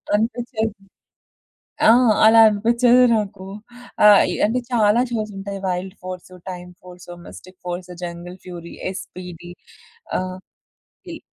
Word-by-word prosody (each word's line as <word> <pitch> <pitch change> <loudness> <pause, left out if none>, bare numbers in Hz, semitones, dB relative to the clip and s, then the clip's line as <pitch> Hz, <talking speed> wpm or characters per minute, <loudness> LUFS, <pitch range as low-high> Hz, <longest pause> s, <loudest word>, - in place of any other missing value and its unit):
అనిపిచ్చేది. 225 -1 -2 1.1
ఆ! - - +8 0.4
అలా 225 +1 +7
అనిపించేది 235 +4 +4
నాకు. 200 -3 -4 0.6
ఆహ్, 205 -1 +7
ఇ - - -2
అంటే 240 +4 0
చాలా 225 0 +3
షోస్ 215 -2 -3
ఉంటాయి. 195 0 -6
Wild 185 +1 -3
force, 185 0 -8 0.2
time 180 0 -9
force, 180 -1 -13 0.2
mystic 185 0 -14
force, 175 0 -5
jungle 175 +1 -7
fury, 170 -2 -9 0.2
SPD 180 -2 -9 0.7
ఆహ్, 185 0 -5 0.7
ఇల్ - - -8
195 Hz, 115 wpm, -21 LUFS, 180-220 Hz, 1.1 s, ఆ